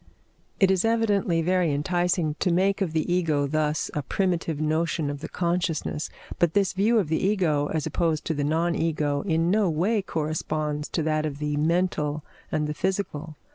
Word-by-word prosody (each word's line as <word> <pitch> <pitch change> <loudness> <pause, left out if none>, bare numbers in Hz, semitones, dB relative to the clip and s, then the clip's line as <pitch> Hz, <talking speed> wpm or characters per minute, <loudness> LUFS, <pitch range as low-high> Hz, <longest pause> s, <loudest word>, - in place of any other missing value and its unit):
It 195 -1 +5
is 190 -1 +2
evidently 205 -7 +2
very 180 -2 +2
enticing 175 +2 0
to 180 - +1
make 195 +4 +2
of 185 -5 0
the 160 +2 0
Ego 155 -5 +1
thus 150 +1 -1
a 150 - -1
primitive 170 -1 -1
notion 155 -1 0
of 145 - -6
the 160 - -7
consciousness; 170 -3 -1 0.3
but 170 -2 +2
this 195 -2 +2
view 210 +5 +3
of 200 -7 +2
the 160 +1 0
Ego 175 -8 +2
as 155 -2 -2
opposed 165 -3 0
to 160 - 0
the 145 -1 -2
non 165 +4 +1
Ego 150 -4 0
in 165 -2 +1
no 205 -2 +3
way 190 +8 +1
corresponds 155 -3 -2
to 165 - -1
that 155 0 0
of 140 -2 -5
the 150 0 -2
mental 155 -2 0 0.3
and 150 - 0
the 150 - -2
physical. 165 -4 -3
165 Hz, 180 wpm, -26 LUFS, 150-185 Hz, 0.3 s, It